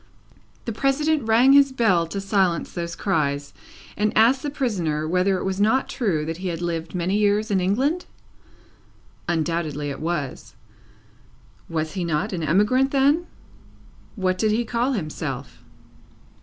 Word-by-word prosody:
The 230 - -2
President 275 +3 0
rang 240 +5 +5
his 280 -1 +6
bell 210 -10 +2
to 200 +5 -4
silence 195 -3 0
those 170 -1 -4
cries, 145 -6 -1 0.4
and 210 0 +1
asked 240 +5 +5
the 295 - -3
prisoner 180 - -1
whether 185 +3 +1
it - - -4
was 190 +1 -2
not 225 +6 +2
true 180 - -1
that 165 +1 -4
he 185 +1 -5
had 170 -2 -3
lived 170 0 -4
many 180 +2 0
years 210 +1 +1
in 195 - +2
England? 265 - 0 1.2
Undoubtedly 160 -3 -1
it - - -7
was. 155 -5 -4 1.1
Was 160 -1 -2
he 185 -2 -2
not 170 +5 -1
an 175 - -3
emigrant 210 - +2
then? 285 +5 +2 0.9
What 185 -3 -1
did 215 - +2
he 225 +3 +1
call 240 +4 0
himself? 155 -10 -5
195 Hz, 145 wpm, -23 LUFS, 165-235 Hz, 1.2 s, his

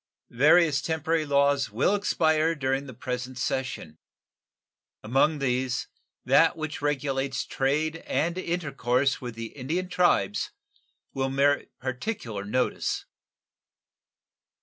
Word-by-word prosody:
Various 150 +3 +4
temporary 160 +1 -1
laws 140 0 +3
will 120 - +1
expire 160 -5 +2
during 135 -1 -1
the 130 - -8
present 125 +1 -5
session. 125 -11 -3 1.0
Among 135 +7 +2
these, 130 -2 -1 0.4
that - - +4
which 155 -2 -5
regulates 140 -2 -1
trade 155 +4 0
and 170 +2 0
intercourse 140 -7 0
with 120 -2 -6
the 115 0 -7
Indian 165 +7 -3
tribes 175 - +2 0.6
will 135 0 -1
merit 140 +1 +2
particular 125 - -4
notice. 125 +5 -1
140 Hz, 105 wpm, -27 LUFS, 125-155 Hz, 1.0 s, Various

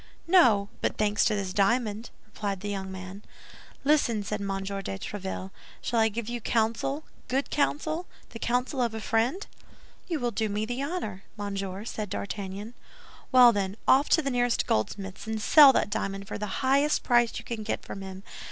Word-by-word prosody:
"No; 235 - +5
but - - -1
thanks 210 -1 +2
to 215 - +2
this 195 -2 -3
diamond," 215 +2 +1 0.2
replied 205 -3 -4
the 205 - -4
young 190 -1 -4
man. 190 +1 -8 0.6
"Listen," 275 -7 +2
said 210 +1 -3
M. 200 - -3
de 195 0 -2 0.3
Tréville; 190 - -5 0.3
"shall 235 - -1
I 220 0 +4
give 220 +1 -5
you 240 0 -4
counsel, 230 +7 0 0.2
good 270 +2 -1
counsel, 310 +4 0 0.2
the 230 - -9
counsel 250 +3 0
of 235 -2 0
a - - -3
friend?" 235 - 0 0.6
"You 335 -4 -1
will 240 -2 -1
do 220 0 -1
me 220 +5 -2
honor, 280 - -3 0.2
monsieur," 200 -1 -4
said 215 -3 -4
D'Artagnan. 200 +3 -5 0.6
"Well, 250 -2 +8
then, 200 0 -2
off 275 +3 +5
to 320 - +4
the 275 - -1
nearest 245 -1 +1
goldsmith's, 195 - -2
and 220 0 -2
sell 285 +6 +8
that 205 - +1
diamond 195 -1 -3
for - - -5
the 210 +6 -4
highest 280 +3 +3
price 240 -2 +3
you - - -7
can 230 -2 -4
get 215 - -3
from 195 - -7
him. 190 0 -8
220 Hz, 180 wpm, -28 LUFS, 200-250 Hz, 0.6 s, Well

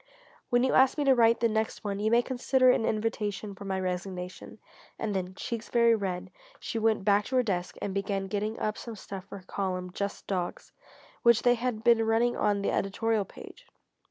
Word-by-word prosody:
When 245 -1 +3
you 260 - +2
ask 265 +2 +5
me 295 - +1
to 275 -1 +5
write 230 -2 +4
the 235 - +4
next 220 0 -2
one, 200 -1 -3
you 215 +1 +1
may 235 +1 +4
consider 255 0 +3
it - - +4
an 225 - 0
invitation 215 -2 -2
for 200 +1 -10
my 190 -1 -1
resignation." 180 0 -5 0.4
And 220 -2 -2
then, 185 -1 -3
cheeks 230 +3 -5
very 235 -1 +4
red, 190 -3 -3 0.3
she 225 - -3
went 220 -3 +1
back 205 0 +3
to 260 - -3
her 255 - +4
desk 180 -5 -2
and 200 - -2
began 195 0 -1
getting 210 +3 -2
up 215 0 -2
some 230 -2 -7
stuff 195 -2 -8
for 200 - -9
her 185 - -14
column 185 -2 -3
"Just 200 +2 -4
Dogs," 180 -3 -3 0.5
which 235 -1 +5
they 245 - +5
had 240 -2 -2
been 235 -1 +5
running 225 +2 +2
on 205 -1 +1
the - - +1
editorial 210 +1 0
page. - - -13
215 Hz, 210 wpm, -29 LUFS, 195-235 Hz, 0.5 s, ask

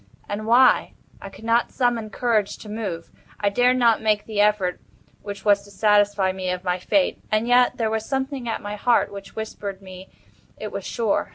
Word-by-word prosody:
And 215 +1 -4
why? 245 +3 +4 0.3
I 195 - -8
could 195 - -15
not 230 +1 +2
summon 240 -4 0
courage 215 -2 0
to 215 - -11
move. 200 -6 -5 0.3
I 205 - +2
dared 245 +4 +3
not 235 -3 +3
make 215 -1 +1
the 210 -2 0
effort 205 -4 +1 0.4
which 205 0 -8
was 205 -1 +4
to 205 - -16
satisfy 205 -1 +2
me 185 -1 -4
of 180 0 -3
my 180 0 -1
fate—and 225 -1 0
yet 245 0 +4
there 225 -2 0
was 220 0 -1
something 265 -1 -3
at 225 - -3
my 205 0 -5
heart 240 +3 +2
which 200 -1 -10
whispered 205 -3 -6
me 185 -1 -12 0.5
it - - -6
was - - -5
sure. 225 -4 -1
210 Hz, 190 wpm, -23 LUFS, 200-235 Hz, 0.5 s, why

